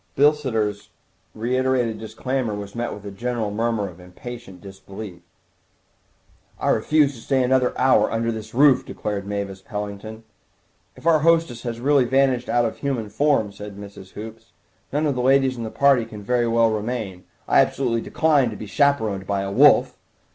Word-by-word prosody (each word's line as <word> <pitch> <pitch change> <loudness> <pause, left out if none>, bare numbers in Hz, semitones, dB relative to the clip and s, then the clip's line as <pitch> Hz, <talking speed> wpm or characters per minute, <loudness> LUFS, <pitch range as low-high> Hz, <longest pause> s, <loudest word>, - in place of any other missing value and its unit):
Bilsiter's 130 -8 +1 0.5
reiterated 125 -1 0
disclaimer 110 +1 -3
was 100 -1 -7
met 120 0 -3
with 105 0 -9
a 100 - -6
general 115 0 -3
murmur 110 -1 -1
of 90 -1 -12
impatient 95 +2 -10
disbelief. 95 0 -10 1.4
"I - - 0
refuse 145 +5 +3
to 115 - -12
stay 130 +1 +1
another 125 0 +1
hour 130 +1 +4
under 115 +1 0
this 110 0 -7
roof," 140 -1 +5
declared 100 -2 -5
Mavis 100 -2 -4
Pellington. 105 +2 -7 0.7
"If - - -16
our 165 -2 +5
hostess 165 -6 +2
has 120 -2 -5
really 140 0 +3
vanished 130 -1 +1
out 120 -1 +2
of 110 - -3
human 125 -7 -2
form," 110 -2 +1
said 100 0 -10
Mrs. 100 -2 -11
Hoops, 110 +1 -10 0.4
"none 150 +3 0
of 145 - +1
the 125 - -2
ladies 135 0 +3
of 120 - -5
the 110 - -4
party 135 -2 +3
can 105 -2 -10
very 120 +2 +1
well 115 0 +3
remain. 105 -4 -4 0.2
I - - +4
absolutely 120 -3 +1
decline 145 -4 +2
to 110 - -7
be 105 - -7
chaperoned 110 -5 +1
by 100 -1 0
a 100 0 -4
wolf!" - - +5
115 Hz, 170 wpm, -22 LUFS, 105-130 Hz, 1.4 s, roof